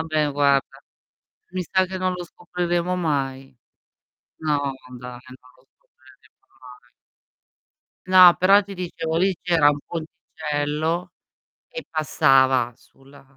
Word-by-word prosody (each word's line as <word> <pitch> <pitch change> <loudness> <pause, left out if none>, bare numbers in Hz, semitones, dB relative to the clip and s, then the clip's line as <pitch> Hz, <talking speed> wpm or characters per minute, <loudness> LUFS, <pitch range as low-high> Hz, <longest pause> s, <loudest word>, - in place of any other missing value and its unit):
vabbè, 155 -2 -1
guarda, 140 -1 +1 0.7
mi 185 0 -3
sa 185 +2 +1
che 185 0 -6
non 185 0 -1
lo 180 -1 -6
scopriremo 175 0 -3
mai. 135 -6 -3 0.8
No, 145 -3 -1 0.2
dai, 125 0 -9 0.2
non 130 0 -22
lo 130 - -27
scopriremo - - -26
mai. 125 -1 -16 1.2
No, 185 -2 +8
però 195 +3 +5
ti 200 0 -11
dicevo: 165 -3 -4
lì 190 0 +1
c'era 165 -5 +3
un 145 0 +1
ponticello 155 +1 -4 0.6
che - - -8
passava 130 -5 +2
sulla 135 +1 -21
155 Hz, 115 wpm, -22 LUFS, 135-180 Hz, 1.2 s, No